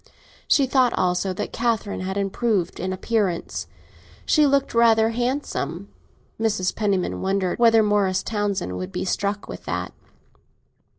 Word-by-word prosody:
She 280 - +4
thought 260 -2 +3
also 180 +1 +1
that - - -5
Catherine 230 -3 -1
had 190 +1 -3
improved 200 -1 -1
in 185 +2 -2
appearance; 190 -2 -1 0.6
she 305 -2 +4
looked 275 0 +1
rather 225 -1 +4
handsome. 245 +5 -3 0.5
Mrs. 205 -5 0
Penniman 200 -4 -1
wondered 190 0 -1
whether 225 -2 +6
Morris 205 -3 +1
Townsend 200 - -2
would 90 +1 -5
be - - -3
struck 200 +2 -2
with - - -9
that. - - -3
205 Hz, 130 wpm, -23 LUFS, 185-230 Hz, 0.6 s, whether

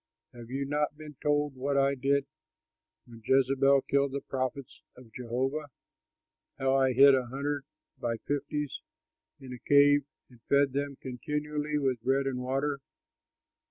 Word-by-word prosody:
Have 120 -1 -11
you 135 +2 -2
not 150 +1 -1
been 150 -1 -10
told 145 -1 +1
what 140 +2 -2
I 140 0 +3
did 140 +1 +1 0.8
when 115 -2 -14
Jezebel 135 +2 +3
killed 140 -1 +1
the 140 - -3
prophets 130 0 -4 0.2
of 120 -3 -16
Jehovah, 130 +5 -2 0.9
how 135 0 +1
I 135 -1 +3
hid 140 +2 +7
a 130 -2 +1
hundred 140 +2 -3 0.3
by 115 -1 -2
fifties 145 0 -3 0.6
in 130 -2 -9
a 125 - -9
cave 145 +1 +5 0.2
and 120 -2 -20
fed 140 -1 +3
them 140 0 -2
continually 150 +4 -3
with 130 -5 0
bread 135 +3 +1
and 130 -2 -2
water?" 135 +3 -1
135 Hz, 145 wpm, -29 LUFS, 130-145 Hz, 0.9 s, hid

